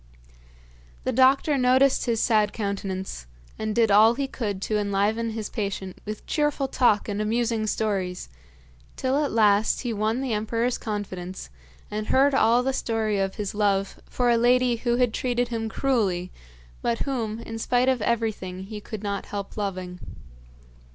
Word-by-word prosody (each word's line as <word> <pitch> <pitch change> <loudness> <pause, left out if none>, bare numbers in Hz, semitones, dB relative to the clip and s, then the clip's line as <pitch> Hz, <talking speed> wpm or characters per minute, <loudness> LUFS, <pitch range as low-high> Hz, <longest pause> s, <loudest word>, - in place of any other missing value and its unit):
The - - 0
doctor 270 +3 +4
noticed 260 +2 +4
his 230 -2 +1
sad 215 -3 +2
countenance 195 - -4 0.3
and 215 -1 -2
did 225 -3 +3
all 220 +3 +6
he 275 +2 -1
could 210 -7 -3
to 215 -1 0
enliven 205 +3 0
his 220 -1 -4
patient 195 -3 -4
with 215 0 -6
cheerful 295 -3 0
talk 245 -6 +2
and 205 0 -2
amusing 225 0 0
stories, 195 -5 -2 0.7
till 270 +3 0
at 285 - -1
last 210 -1 +3
he 240 -3 -2
won 215 +3 0
the 260 -4 -1
emperor's 230 +3 -1
confidence 190 -4 -5 0.4
and 215 +1 -3
heard 275 +2 +4
all 240 -1 +4
the 270 +1 0
story 220 -5 -1
of 195 0 -1
his 205 -2 -4
love 200 -2 0
for 245 -1 +1
a 235 - +4
lady 245 0 +3
who 240 +1 0
had 245 -2 +2
treated 245 -1 0
him 225 -1 -3
cruelly, 205 -9 0 0.5
but 115 - -1
whom, 230 -6 -2
in 225 -1 -6
spite 245 +2 +1
of 260 -3 +2
everything, 210 -5 -2
he 210 +2 -7
could 215 0 -7
not 200 -1 -3
help 200 -1 -6
loving. 185 -3 -4
220 Hz, 160 wpm, -25 LUFS, 205-245 Hz, 0.7 s, all